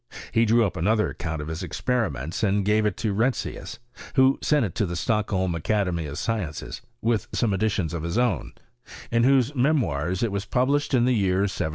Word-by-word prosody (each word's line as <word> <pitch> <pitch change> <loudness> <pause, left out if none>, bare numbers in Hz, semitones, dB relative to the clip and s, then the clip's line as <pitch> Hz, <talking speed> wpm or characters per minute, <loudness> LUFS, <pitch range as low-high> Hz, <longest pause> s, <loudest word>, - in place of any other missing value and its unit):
He 115 +1 +3
drew 115 +1 +4
up 95 -2 -3
another 105 +5 +1
account 80 -3 -4
of - - -8
his 80 +2 -4
experiments 90 - -2
and 100 -2 +1
gave 105 +1 +3
it 105 - -3
to 110 -3 -1
Retzius, 120 +6 -2 0.4
who 130 0 +4
sent 150 -5 +2
it 90 - -5
to 105 - 0
the 85 - -4
Stockholm 95 -2 0
Academy 85 -1 -1
of 70 - -6
Sciences 100 -10 -3 0.2
(with 115 -3 +1
some 110 -4 +1
additions 95 -4 0
of 85 - -3
his 85 +6 -2
own), 120 - 0 0.6
in 115 0 +3
whose 135 0 +3
Memoirs 115 - +1
it 115 - 0
was 100 0 -3
published 140 +5 +1
in 120 -1 +3
the 125 - +3
year 95 -4 +2
1770. 95 -5 -1
105 Hz, 195 wpm, -25 LUFS, 90-120 Hz, 0.6 s, drew